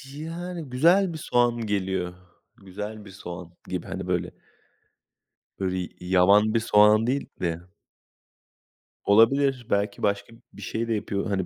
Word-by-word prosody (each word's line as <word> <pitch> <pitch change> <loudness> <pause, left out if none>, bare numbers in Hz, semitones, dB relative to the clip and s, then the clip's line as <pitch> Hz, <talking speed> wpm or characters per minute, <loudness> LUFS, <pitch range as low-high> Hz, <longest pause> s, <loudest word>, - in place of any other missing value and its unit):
Yani, 165 0 -6
güzel 170 +8 +3
bir - - -5
soğan 120 -5 +1
geliyor. 95 -3 -1 0.4
Güzel 105 +3 -8
bir - - -11
soğan 90 -2 -9
gibi. - - -4
Hani, - - -5
böyle. - - -1 1.3
Böyle 95 -1 -1
y 90 - -4
yaban 95 +4 +4
bir 115 - +3
soğan 110 0 +5
değil 135 +3 -1
de. 85 -1 -1 1.4
Olabilir. 125 +4 +4
Belki 100 0 -1
başka 100 +2 -1 0.2
bir - - -12
şey 115 +1 -3
de 115 - 0
yapıyor 100 -2 -2
hani. 95 -2 0
105 Hz, 135 wpm, -25 LUFS, 95-125 Hz, 1.4 s, soğan